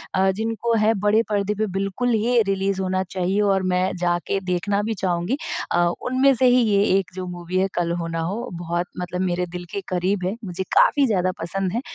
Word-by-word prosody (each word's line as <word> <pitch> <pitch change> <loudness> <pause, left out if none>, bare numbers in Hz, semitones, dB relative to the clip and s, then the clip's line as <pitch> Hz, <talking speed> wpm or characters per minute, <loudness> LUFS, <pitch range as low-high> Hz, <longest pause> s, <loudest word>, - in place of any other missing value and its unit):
अ, 190 +1 +3
जिनको 225 +3 -1
है 215 +1 +3
बड़े 215 +2 +4
पर्दे 205 -1 0
पे 215 +1 0
बिल्कुल 195 +6 -1
ही 235 +3 +2
रिलीज़ 195 0 0
होना 185 0 0
चाहिए, 190 +2 -1
और 195 -2 +2
मैं 185 0 0
जाकर 175 +2 0
देखना 195 +3 0
भी 225 +1 -1
चाहूँगी। 180 +7 0 0.3
अ, 175 0 +3 0.2
उनमें 260 +2 +4
से 255 - +2
ही 250 0 +5
ये 200 -1 +4
एक 185 -5 -2
जो 185 -1 -4
मूवी 175 0 -4
है 190 - +2
कल 170 -1 0
हो 165 - -3
ना 165 0 -3
हो, 210 +9 -3
बहुत 175 +1 -3
मतलब 180 0 -3
मेरे 180 -1 0
दिल 180 0 -6
के 200 -1 -3
क़रीब 185 +1 0
है। 190 +4 -1
मुझे 185 0 -4
काफ़ी 285 -1 +5
ज़्यादा 185 -4 +1
पसंद 185 +2 -2
है। 235 - -1
190 Hz, 210 wpm, -23 LUFS, 180-210 Hz, 0.3 s, ही